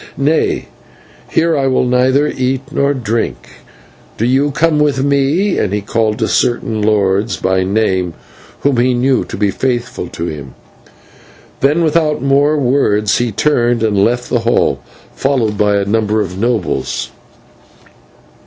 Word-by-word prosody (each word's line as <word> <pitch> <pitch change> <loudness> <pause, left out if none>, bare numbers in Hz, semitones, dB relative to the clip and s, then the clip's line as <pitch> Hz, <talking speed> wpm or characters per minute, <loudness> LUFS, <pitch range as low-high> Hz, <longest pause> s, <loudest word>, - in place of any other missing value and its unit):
Nay, 150 +4 0 0.6
here 165 0 +1
I 135 -2 +1
will 130 -1 +1
neither 130 +3 +2
eat 130 -1 -1
nor 140 0 +1
drink. 115 -2 -3 0.6
Do 115 - 0
you 135 +4 +2
come 155 +1 +1
with 145 -3 +1
me," 140 +8 +1
and 105 - -1
he 105 0 -1
called 110 +1 -1
to - - 0
certain 115 -2 0
lords 105 0 +1
by 95 0 0
name 95 -3 0 0.5
whom 140 -3 +1
he 125 +1 +2
knew 130 +1 +1
to - - -7
be 100 -1 +1
faithful 125 -4 -2
to 85 - -6
him. 70 -6 -7 1.0
Then, 150 +5 +2
without 155 -1 +1
more 140 +3 +2
words, 120 -6 +1
he 120 -1 -1
turned 120 0 +1
and 100 -3 +2
left 120 +2 0
the 120 - 0
hall, 115 +1 +1 0.3
followed 125 -6 0
by 105 0 +2
a 100 -1 0
number 110 +1 0
of 95 -4 -2
the 115 - +1
nobles. 115 -7 -2
120 Hz, 150 wpm, -15 LUFS, 105-140 Hz, 1.0 s, neither